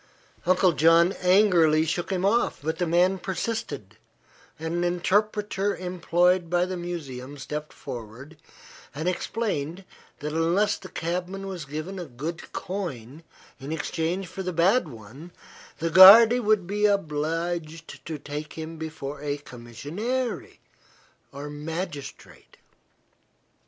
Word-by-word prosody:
Uncle 185 0 +4
John 165 +3 +5
angrily 180 -5 +4
shook 170 +2 -2
him 190 0 0
off, 230 +4 +1
but 160 +2 -2
the 175 - 0
man 180 +3 +3
persisted, 225 +5 -4 0.6
and 160 +1 -4
an 175 0 0
interpreter 205 +3 0
employed 180 0 +1
by 175 +1 +2
the 185 0 -4
museum 145 -6 -6
stepped 150 +2 -6
forward 125 +4 -9 0.6
and 155 +4 -3
explained 185 -3 -2 0.3
that 150 +1 -5
unless 175 +6 +1
the 185 - -11
cabman 180 +3 -4
was 185 -5 -6
given 155 +7 -6
a 175 - -5
good 155 +5 -7
coin 155 - -5 0.4
in 140 +2 -7
exchange 165 +3 -2
for 185 +2 -7
the 180 -1 -3
bad 180 +5 +3
one 130 +7 -12 0.5
the 165 0 -2
guarde 220 +7 +10
would 215 -5 +2
be 210 +3 +1
obliged 165 -2 -2
to 160 -2 -4
take 150 +1 -7
him 160 0 -7
before 150 -3 -6
a 145 -1 -2
commissionaire, 155 - -4 0.8
or 140 +2 -7
magistrate. 150 0 -7
170 Hz, 125 wpm, -26 LUFS, 150-190 Hz, 0.8 s, guarde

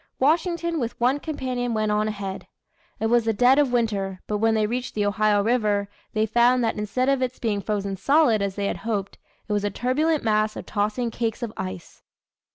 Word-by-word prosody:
Washington 335 +3 +1
with 235 -3 -4
one 255 +4 +2
companion 255 -6 -3
went 215 -1 0
on 210 +1 +1
ahead. 200 -3 -5 0.5
It 220 - -1
was 235 0 +3
the 225 - +2
dead 250 +6 +5
of 285 -4 +2
winter, 200 -6 -1
but 210 -1 -2
when 225 +1 +3
they 215 -1 +2
reached 245 +3 -3
the 205 -1 +1
Ohio 205 0 +2
River, 210 -3 +1 0.2
they 215 0 +2
found 240 +3 +3
that 225 - 0
instead 210 +5 -1
of 275 -1 +2
its 255 0 -2
being 210 -4 -1
frozen 200 -2 -2
solid, 275 - +3
as 200 -1 -2
they 200 - -2
had - - -1
hoped, 205 -4 -3 0.3
it 210 - -2
was 205 -1 0
a 205 - +1
turbulent 290 - 0
mass 215 -1 +1
of - - -7
tossing 215 +3 -1
cakes 230 +1 -3
of 225 -2 -4
ice. 95 -1 -7
225 Hz, 205 wpm, -24 LUFS, 205-250 Hz, 0.5 s, dead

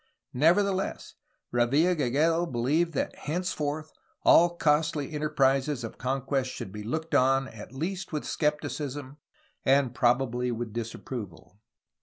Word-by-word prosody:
Nevertheless, 190 +7 +1 0.4
Revilla 140 +9 +3
Gigedo 160 +5 +2
beUeved 150 +8 +1
that - - -2
henceforth 155 -2 -3 0.3
all 175 0 +6
costly 150 -1 +1
enter 150 0 -2
prises 135 -1 +2
of 115 - -7
conquest 135 0 -1
should 95 - -7
be 105 +1 -7
looked 160 +9 -4
upon 135 +1 +3
at 110 0 -11
least 175 +9 -4
with 150 -2 -3
scepticism 145 -2 -2 0.5
and 135 -2 +3
probably 125 0 +1
with 115 -2 -4
disapproval. 105 -6 -7
140 Hz, 120 wpm, -28 LUFS, 125-155 Hz, 0.5 s, all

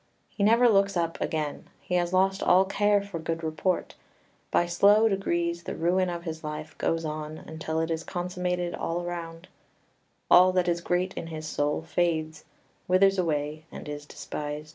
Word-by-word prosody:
He 200 - -3
never 230 +4 +5
looks 200 -3 +3
up 165 -1 -2
again; 155 -2 -3
he - - -7
has 175 -1 +1
lost 190 +1 +2
all 185 +2 +5
care 205 +1 +2
for 200 -4 -6
good 165 0 -3
report; 160 +3 -1 0.6
by 175 - +2
slow 205 +5 +5
degrees 170 -4 -1
the - - -6
ruin 180 +2 +1
of 170 -1 -5
his 160 -2 -6
life 155 0 -6
goes 165 0 0
on, 155 0 -5
until 160 0 -4
it 165 +1 -1
is 165 0 -2
consummated 180 0 -2
all 175 +1 -2
round; 170 0 -6 0.8
all 185 +1 +7
that 180 -1 +2
is 170 0 0
great 180 +2 0
in 165 - -6
his 155 -1 -6
soul 150 0 -1
fades, 160 -2 -1 0.4
withers 195 +1 +4
away, 155 -2 -1
and - - -9
is 145 0 -6
despised. 150 0 -6
170 Hz, 170 wpm, -27 LUFS, 160-185 Hz, 0.8 s, all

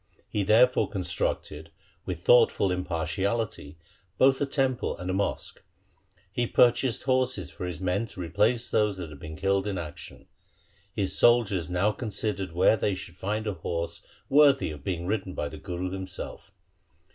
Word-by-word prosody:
He - - -2
therefore - - +4
constructed - - -3 0.4
with - - -4
thoughtful 465 - +5
impartiality 90 -1 -2 0.4
both 135 +1 +4
a 140 - +1
temple 135 -3 0
and 90 +1 -4
a - - -1
mosque. 100 +1 -2 0.7
He 120 -1 -1
pur 120 +1 +6
chased 125 -1 -2
horses 130 - 0
for 90 - -6
his 90 -1 -5
men 95 +4 -1
to 95 - -12
replace 105 +7 +1
those 105 -2 +2
which 85 -4 -6
had 75 -2 -11
been 80 +2 -8
killed 95 +3 0
in 100 -2 -2
action. 80 -4 -8 0.7
His 100 -2 -1
soldiers 105 -9 +3
now 90 +4 +2
considered 105 -5 -3
where 90 +5 +4
they 100 -1 0
should 90 -1 -9
find 105 +4 -3
a 105 - -1
horse 85 -1 -4 0.3
worthy 140 - +5
of 75 -2 -10
being 85 -1 -3
ridden 95 -1 -2
by 75 - -2
the - - -9
Guru 90 +1 -4
himself. 95 +1 -7
100 Hz, 160 wpm, -27 LUFS, 90-115 Hz, 0.7 s, pur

